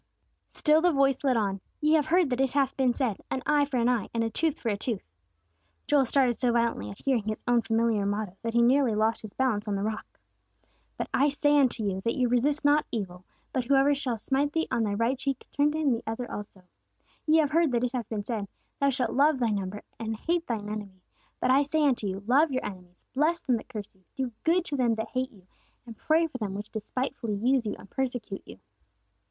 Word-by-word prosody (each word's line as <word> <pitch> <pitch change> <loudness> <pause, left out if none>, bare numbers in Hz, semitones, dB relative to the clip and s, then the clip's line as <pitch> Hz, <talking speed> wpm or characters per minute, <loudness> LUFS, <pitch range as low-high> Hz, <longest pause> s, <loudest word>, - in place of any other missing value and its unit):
Still 305 0 +3
the 355 +1 +4
voice 275 -2 +2
led 260 -4 +3
on, 195 -3 -1 0.2
"Ye 305 +1 +3
have 305 -3 +3
heard 345 -4 +3
that 250 +1 +1
it 270 -1 +1
hath 275 -2 +1
been 260 -2 +2
said, 240 -6 -2
'An 260 - -3
eye 295 -1 +3
for 280 -3 -3
an 235 0 +2
eye 245 -5 +1
and 230 - +1
a 225 - -2
tooth 320 +5 0
for 235 - -2
a 205 - +1
tooth.'" 205 - -4 0.7
Joel 285 -2 +3
started 255 -1 +3
so 245 +1 0
violently 235 - 0
at 100 - -11
hearing 260 -4 +2
his 215 - -3
own 240 -1 +4
familiar 225 -2 +1
motto, 205 -1 -2
that 230 0 -3
he 235 - +5
nearly 250 -2 +3
lost 220 +2 +1
his 215 -2 -9
balance 225 -6 0
on 205 - 0
the 195 - -2
rock. 215 0 -5 0.8
"But - - -3
I 285 +2 +4
say 290 +1 +2
unto 250 -4 +2
you 190 -2 -1
that 230 +3 -1
you 250 -2 +1
resist 285 +5 +1
not 295 +1 +4
evil: 185 -5 -5 0.3
but 255 -2 0
whosoever 275 +2 +4
shall 260 -4 -2
smite 275 +6 0
thee 325 0 0
on 235 - +1
thy 205 -2 0
right 230 +5 +1
cheek, 270 -1 -3
turn 290 +1 +2
to - - -2
him 305 -3 +2
the 230 -1 0
other 225 +2 -4
also.... 205 -2 -8 0.6
Ye 310 +1 +5
have 300 -3 +2
heard 325 -2 +3
that 240 0 +1
it 250 - 0
hath 245 -5 -4
been 210 -2 -3
said, 210 -3 -3 0.3
Thou 280 - +3
shalt 260 -1 -1
love 290 +2 +3
thy 240 -3 +1
neighbor, 200 0 -3 0.2
and 225 -1 -3
hate 335 +8 -1
thine 220 -4 -3
enemy. 200 -3 -7 0.4
But 255 - +2
I 270 +2 +5
say 300 +2 +1
unto 245 -7 +1
you, 190 +1 -4
Love 280 +6 +4
your 255 - -2
enemies, 180 -3 -10
bless 310 +6 +2
them 255 - +1
that 225 - -11
curse 210 -5 -7
you, 190 -1 -30
do 260 -3 -2
good 340 +2 +3
to 285 - -2
them 240 -4 +2
that 220 0 -4
hate 255 0 -2
you, 190 -5 -20 0.4
and 230 -2 -10
pray 320 +8 +2
for 275 -6 -6
them 200 -3 -3
which 205 +2 -7
despitefully 230 0 -3
use 245 +3 +1
you, 210 - -2
and - - -13
persecute 245 -5 -3
you." 90 - -11
245 Hz, 240 wpm, -28 LUFS, 215-280 Hz, 0.8 s, he